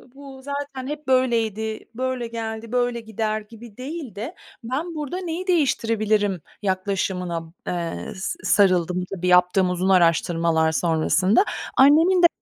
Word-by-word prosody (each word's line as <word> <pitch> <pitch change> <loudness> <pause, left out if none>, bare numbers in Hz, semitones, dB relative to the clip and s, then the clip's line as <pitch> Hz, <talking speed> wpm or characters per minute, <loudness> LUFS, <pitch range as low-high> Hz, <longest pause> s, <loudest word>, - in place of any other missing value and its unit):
bu 275 -1 -11
zaten 280 -2 -5
hep 300 -1 -6
böyleydi 225 -4 0
-böyle 255 -2 -2
geldi, 225 0 -5
böyle 245 -1 0
gider 220 0 -2
gibi 225 0 -14
değil 270 - -6
de. 235 - -6 0.3
"Ben 305 +8 -3
burada 300 +4 -4
neyi 355 +2 -4
değiştirebilirim?" 215 - +1 0.2
yaklaşımına 185 -3 -2
b - - -18 0.2
eee, 170 - -3
s 190 - -4
sarıldım. 180 -2 +3
Tabii, 180 0 -3
yaptığım 180 +1 +4
uzun 180 +1 0
araştırmalar 165 -2 +3
sonrasında 175 - +2 0.3
annemin 325 +7 +6
de - - +10
220 Hz, 130 wpm, -23 LUFS, 180-265 Hz, 0.3 s, de